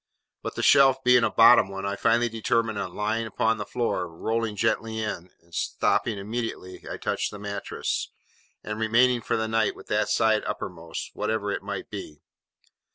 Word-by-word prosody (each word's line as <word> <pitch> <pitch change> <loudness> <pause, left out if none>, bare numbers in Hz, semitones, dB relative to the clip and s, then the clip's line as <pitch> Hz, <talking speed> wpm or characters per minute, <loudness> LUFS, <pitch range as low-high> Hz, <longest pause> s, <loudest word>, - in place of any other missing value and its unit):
But - - -5
the - - -3
shelf 135 -1 +5
being 125 -1 +5
a - - +3
bottom 115 -3 +6
one, 95 0 -5
I 100 0 -1
finally 120 +4 +2
determined 115 -1 0
on 100 - -5
lying 110 +2 -1
upon 110 +1 0
the 105 - -5
floor, 115 -7 -1
rolling 110 +6 -2
gently 115 +1 0
in, 105 -5 -4 0.2
stopping 105 +5 0
immediately 105 -3 -5
I - - -5
touched - - -1
the 105 - -9
mattress, 100 0 -3 0.5
and 105 0 -5
remaining 120 +2 +3
for - - -1
the 110 0 -1
night 110 -1 +1
with - - -13
that - - +1
side 110 -2 +2
uppermost, 85 -3 -5
whatever 105 -1 -2
it - - -3
might 100 -1 -6
be. 95 -7 -7
110 Hz, 170 wpm, -26 LUFS, 100-115 Hz, 0.5 s, bottom